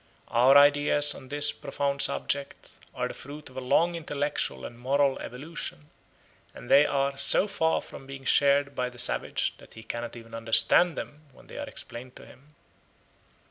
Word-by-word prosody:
Our 130 +4 +5
ideas 145 0 +4
on 130 - -12
this 145 0 +4
profound 140 0 -3
subject 140 0 -1 0.2
are - - -2
the - - -8
fruit 145 0 -10
of 130 - -14
a - - -3
long 170 +7 +2
intellectual 145 - -3
and 120 - -10
moral 135 +2 +1
evolution, 150 +4 -7 0.6
and - - -9
they 145 +2 +7
are 140 -1 -1
so 140 +8 +4
far 160 -5 0
from 135 - -12
being 135 0 -9
shared 140 0 +3
by 125 -1 -2
the 125 - -16
savage 120 - -1
that - - -17
he 110 - -11
cannot 120 +1 -6
even 115 -1 -13
understand 115 +9 +3
them 150 +1 -8
when - - -18
they - - -10
are - - -5
explained 125 +2 -9
to - - -13
him. 150 +3 -19
140 Hz, 175 wpm, -27 LUFS, 125-145 Hz, 0.6 s, they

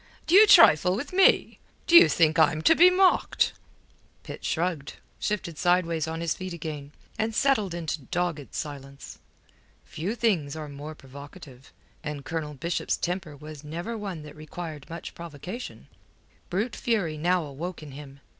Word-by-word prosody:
D'you 400 +6 +7
trifle 180 - +7
with 285 - -6
me? 385 +1 +3 0.3
D'you 345 0 +8
think 165 0 +2
I'm 160 0 +3
to - - +6
be 355 +3 +7
mocked?" 370 0 +2 0.7
Pitt - - -9
shrugged, 165 -4 -2 0.2
shifted 180 -7 -3
sideways 170 -3 +1
on 165 +1 -4
his 170 -2 0
feet 185 -1 -7
again, 150 -4 -7 0.3
and 220 0 -1
settled 215 -11 +1
into 160 -2 -4
dogged 175 -4 -3
silence. 140 -2 -8 0.7
Few 190 +9 -4
things 185 -12 0
are 155 -1 -6
more 145 +2 -8
provocative; 140 -1 -13 0.3
and 150 -3 -6
Colonel 155 -2 -4
Bishop's 170 +6 -2
temper 175 -4 -4
was 150 0 -10
never 170 +10 -5
one 195 -7 -6
that 150 0 -11
required 155 -1 -8
much 165 0 -8
provocation. 170 - -8 0.6
Brute 210 +7 -2
fury 200 -10 -1
now 175 +3 +1
awoke 155 +4 -7
in 150 - -10
him. 140 0 -11
165 Hz, 145 wpm, -26 LUFS, 150-185 Hz, 0.7 s, D'you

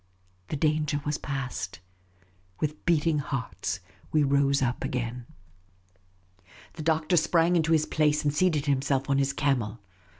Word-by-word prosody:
The - - -3
danger 150 0 +1
was 150 0 -1
past. 130 - -4 0.8
With 150 +1 -3
beating 160 -2 +3
hearts 135 -2 -3 0.3
we 155 -1 +3
rose 140 0 +3
up 125 0 -1
again. 120 -1 -3 1.5
The 160 - -8
Doctor 160 +2 +2
sprang 170 +2 +3
into 165 -1 +2
his 155 -1 +4
place 150 -1 +1
and 145 -1 +1
seated 155 -2 +2
himself 135 -1 +1
on 135 - +3
his 140 0 +2
camel. 130 -7 0
145 Hz, 135 wpm, -27 LUFS, 135-155 Hz, 1.5 s, his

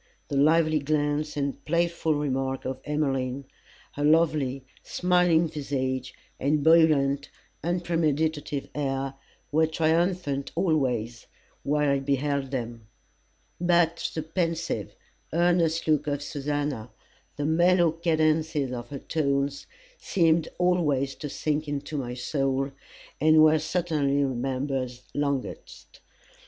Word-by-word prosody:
The - - -2
lively 155 +2 +4
glance 150 +1 -1
and 140 -1 -2
playful 170 -1 0
remark 135 -2 -2
of 130 0 -4
Emmeline, 135 -3 -1 0.5
her 145 - -4
lovely, 150 -4 +2 0.2
smiling 180 -2 +2
visage, 130 -4 -3 0.2
and 145 +2 +1
buoyant, 145 -4 +4 0.3
unpremeditative 160 -4 -1
air, 135 -2 -2 0.4
were 160 +2 +3
triumphant 160 -2 0
always 125 - 0 0.3
while 150 +1 +1
I 140 -1 +2
beheld 140 0 -1
them; 120 -4 -5 0.7
but 175 -1 +2
the 160 - -2
pensive, 165 - -2 0.4
earnest 170 -1 +2
look 150 -1 +2
of 145 0 -1
Susannah, 145 -5 -3 0.5
the 145 - -3
mellow 170 +2 +4
cadences 155 -3 +1
of 120 -1 -6
her 145 - -5
tones, 140 -1 -1 0.3
seemed 165 -3 +2
always 150 -7 +1
to 150 - -7
sink 150 +2 -2
into 145 +1 -4
my 125 -3 -4
soul, 135 +1 -1 0.5
and 155 +1 +6
were 155 0 +5
certainly 155 -4 0
remembered 130 0 -2 0.2
longest. 140 -2 -4
150 Hz, 110 wpm, -26 LUFS, 135-160 Hz, 0.7 s, and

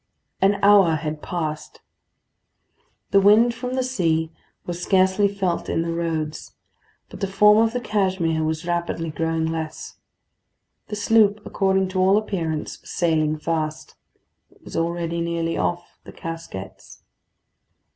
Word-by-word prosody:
An 200 +1 +4
hour 200 -5 +6
had 155 -1 -4
passed. 155 -3 -5 1.3
The 200 - +6
wind 220 +4 +5
from 250 +2 -5
the 260 - 0
sea 165 -10 0 0.3
was 175 0 -5
scarcely 190 +2 +3
felt 195 -3 -2
in 165 - 0
the 165 0 -3
roads; 160 -2 -3 0.6
but - - -10
the 195 - -1
form 210 +2 +5
of 225 0 +3
the 245 - -2
Cashmere 190 -8 0
was 160 +1 -2
rapidly 170 -2 -2
growing 165 0 -1
less. 160 -1 -5 0.9
The 210 - -5
sloop, 210 0 +3
according 190 -1 +1
to 185 0 -2
all 190 +2 +4
appearance, 170 -8 -3
was - - -15
sailing 155 -3 +1
fast. 155 -1 -3 0.6
It - - -27
was - - -10
already 170 0 -1
nearly 170 0 -1
off 175 0 -3
the - - -11
Casquets. 165 -13 -9
170 Hz, 135 wpm, -23 LUFS, 160-200 Hz, 1.3 s, hour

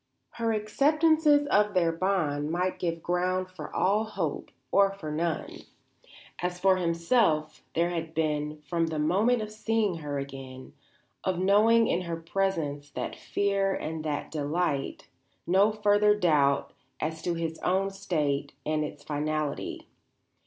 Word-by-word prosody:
Her 230 -1 -1
acceptances 295 +7 +3
of 210 0 +3
their 170 -2 +3
bond 165 -5 0
might 180 +3 -1
give 165 -2 -2
ground 185 +1 0
for 185 - -8
all 205 +3 +2
hope 190 -8 -3 0.2
or 195 0 +5
for 160 -6 -6
none. 160 +1 -2 0.8
As 180 0 -2
for 190 0 +4
himself 170 -3 +1
there 170 +1 +2
had 165 -2 -4
been, 150 -1 -1
from 165 +2 0
the 160 -1 -3
moment 205 +10 +2
of 215 - -7
seeing 215 -4 0
her 145 -3 -4
again, 135 -2 -8 0.5
of 185 -2 0
knowing 215 +5 +5
in 175 - +1
her 170 -2 -4
presence 165 -5 -2
that - - -5
fear 200 -1 0
and 160 0 -4
that 150 -2 -3
delight, 150 -1 -2 0.4
no 195 +4 +4
further 210 0 +3
doubt 150 -8 +2 0.3
as 160 +1 -3
to 175 0 -1
his 165 -1 -3
own 195 +2 +1
state 155 -8 -1
and 155 0 0
its 150 -1 -7
finality. 150 0 -3
175 Hz, 140 wpm, -28 LUFS, 155-200 Hz, 0.8 s, or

